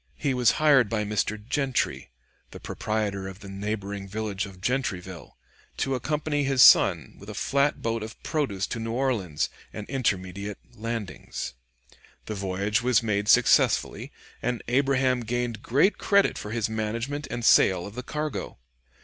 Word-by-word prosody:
He 140 - 0
was 125 -2 +3
hired 140 -7 +4
by 110 -2 0
Mr. 105 +1 -1
Gentry, 135 - -1 0.4
the - - -10
proprietor 105 -3 -3
of 95 +1 -10
the 100 - -9
neighboring 100 0 -4
village 105 0 -3
of 95 -2 -13
Gentryville, 95 - -3 0.4
to 135 - 0
accompany 145 +2 -1
his 135 -2 +5
son 85 -8 +6
with - - -11
a - - -7
flat 140 +1 +1
boat 115 0 -1
of 110 +1 -7
produce 135 - -1
to 115 - -5
New 115 0 -3
Orleans 115 - 0 0.2
and 105 -1 -7
intermediate 100 -6 -2 0.2
landings. 110 - -5 0.7
The 110 - -4
voyage 100 +2 -1
was 125 -1 +3
made 105 -2 0
successfully, - - +3 0.3
and 125 -1 -2
Abraham 130 0 +2
gained 120 -1 -3
great 145 - +2
credit 200 -1 +3
for 105 - -6
his 115 -1 -1
management 115 +7 -3
and 120 - -4
sale 90 -6 +5
of 100 - -8
the 125 - -5
cargo. 150 +3 -4
110 Hz, 150 wpm, -26 LUFS, 100-130 Hz, 0.7 s, son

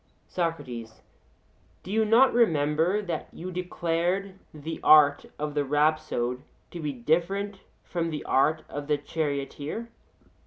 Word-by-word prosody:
SOCRATES: 125 -10 -4 0.8
Do 185 - -8
you 220 +1 +2
not 235 +5 +5
remember 165 -2 +2
that 170 -5 -4
you 180 +2 -7
declared 180 +2 -1 0.2
the 155 +2 -6
art 145 -2 +6
of 150 0 -3
the 145 -1 +1
rhapsode 145 -4 0 0.3
to 175 - -7
be 150 -2 -2
different 175 +10 -1 0.2
from 170 -2 -2
the 150 -2 -4
art 155 +4 +2
of 145 0 -6
the 150 -1 +2
charioteer? 145 +8 -3
160 Hz, 125 wpm, -27 LUFS, 145-180 Hz, 0.8 s, art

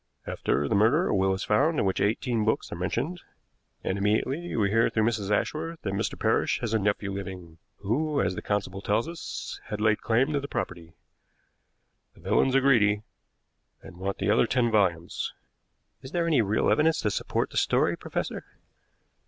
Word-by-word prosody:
After 70 +1 -1
the - - -1
murder 115 - +3
a - - +1
will 95 0 +2
is 95 +2 -2
found 145 +9 +2
in - - +1
which 95 - 0
eighteen 115 +2 +1
books 110 - 0
are - - -4
mentioned, 150 - -2 0.6
and 95 - -1
immediately 130 - 0
we 100 -3 +1
hear 115 +1 +3
through 110 - +1
Mrs. 110 -3 0
Ashworth 160 +9 -1
that 95 - -2
Mr. 100 - -2
Parrish - - +1
has 115 -2 -2
a 110 - +3
nephew 100 0 -1
living, 90 -4 -7 0.2
who, 140 +9 0
as 90 - +1
the - - -5
constable 100 -2 -2
tells 105 +7 0
us, 165 0 -6
had 105 - -5
laid 110 0 +2
claim 125 +6 +2
to 145 - +1
the 140 - -6
property. 90 - -5 1.2
The - - -18
villains 130 0 +2
are 135 - +5
greedy, 105 -6 +3 0.8
and 85 - -12
want 95 +2 -3
the 100 +2 +1
other 115 - +4
ten 120 -2 +1
volumes." 90 -6 0 0.7
"Is 130 - -11
there 170 -1 +1
any 155 -7 +3
real 105 +1 +1
evidence 160 +1 +3
to 105 - 0
support - - -1
the - - -5
story, - - +2
professor?" - - -4
110 Hz, 185 wpm, -27 LUFS, 100-135 Hz, 1.2 s, are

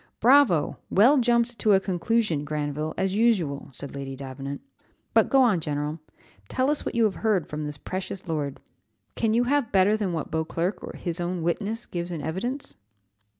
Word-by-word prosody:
"Bravo! 240 - +4
well 250 +9 +5
jumped 235 -1 +2
to 215 - +4
a 190 - +6
conclusion, 190 -3 0
Granville, 150 +1 -3
as 190 0 0
usual," 195 -11 +1
said 135 +2 -8
Lady 135 -1 -5
Davenant, 135 +1 -6 0.5
"But - - +4
go 270 -2 +5
on, 215 -8 +3
general, 150 0 -3 0.5
tell 260 +3 +1
us 300 - -1
what - - -4
you 230 - +3
have 215 -3 +3
heard 210 -8 +1
from 150 0 -4
this 150 -1 -5
precious 185 +4 -5
lord; 150 -4 -2 0.5
can 225 -1 +1
you 240 - +4
have 275 -1 +1
better 195 +2 +4
than 205 -4 -1
what 160 -3 -4
Beauclerc, 165 +4 -1
his 175 -1 -4
own 175 -1 -2
witness, 210 +7 -2
gives 175 0 -4
in 160 -4 -4
evidence?" 240 - -3
185 Hz, 175 wpm, -26 LUFS, 150-225 Hz, 0.5 s, a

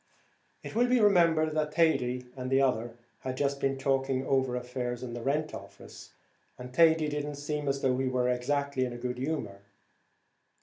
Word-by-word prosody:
It - - -7
will 240 +3 +3
be 250 0 +3
remembered 170 -7 +4
that 150 0 -2
Thady 125 -7 +2
and 130 -1 -5
the 135 0 +3
other 120 -3 0 0.2
had 130 0 -5
just 140 0 0
been 135 0 0
talking 135 -1 0
over 130 -2 +1
affairs 125 0 -4
in 120 -2 -6
the 120 - -5
rent 150 +5 -1
office, - - -11 0.5
and 125 0 -9
Thady 160 +1 +5
did 150 0 -2
not 145 -1 -5
seem 150 0 -3
as 140 0 -1
though 130 -1 +3
he 135 - 0
were 125 -1 +1
exactly 135 +2 0
in 125 -1 -3
a - - -6
good 125 0 -4
humour. 130 -8 -3
135 Hz, 185 wpm, -29 LUFS, 125-150 Hz, 0.5 s, Thady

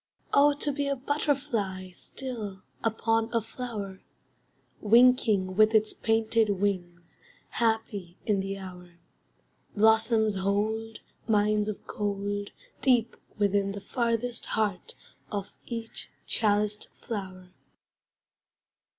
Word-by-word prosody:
Oh! 290 +1 +6
To 290 0 0
be 285 0 -1
a 280 - +1
butterfly 255 - -1
Still, 210 -1 -6 0.2
upon 225 0 +1
a 230 - +2
flower, 220 -4 -6 0.8
Winking 220 -4 +4
with 215 +2 +5
its 215 0 +3
painted 225 0 +2
wings, 175 -4 -3 0.3
Happy 215 -6 -1
in 205 -3 +2
the 195 +1 -3
hour. 180 -2 -10 0.8
Blossoms 220 -1 +4
hold 215 +3 -1 0.3
Mines 210 -1 +3
of 215 - -5
gold 205 0 -2 0.3
Deep 240 -3 +3 0.2
within 200 -1 +2
the 200 - -5
farthest 235 +2 -1
heart 205 -5 -1 0.4
of 200 -1 -3 0.2
each 230 -1 -5 0.2
chaliced 210 -1 +1 0.2
flower. 185 -4 -5
215 Hz, 100 wpm, -28 LUFS, 200-230 Hz, 0.8 s, Oh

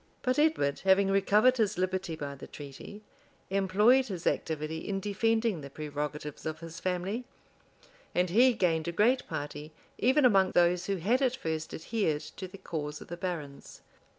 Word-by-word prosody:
But 255 +1 +1
Edward, 300 - +2
having 195 +1 +4
recovered 210 +6 +4
his 210 -2 +1
liberty 185 -2 -1
by 145 -2 -5
the 140 - -10
treaty, 145 +9 -10 0.5
employed 210 +7 +4
his 185 -6 -6
activity 155 0 -1
in 195 +3 -3
defending 220 -1 0
the 140 - -8
prerogatives 150 0 -5
of 155 - -4
his 165 0 -9
family; 185 +6 -2 0.9
and 180 0 +2
he 245 +6 +6
gained 165 -7 +1
a - - 0
great 240 +8 +2
party 150 +1 -6 0.3
even 260 +4 +4
among 195 -5 +4
those 175 0 +3
who 200 - 0
had 215 +9 +1
at 255 -2 +2
first 160 -9 -4
adhered 160 -4 -1 0.2
to 185 - -5
the 190 +2 -12
cause 150 -4 -5
of - - -12
the 175 - -5
barons. 160 -6 -6
185 Hz, 165 wpm, -30 LUFS, 160-215 Hz, 0.9 s, he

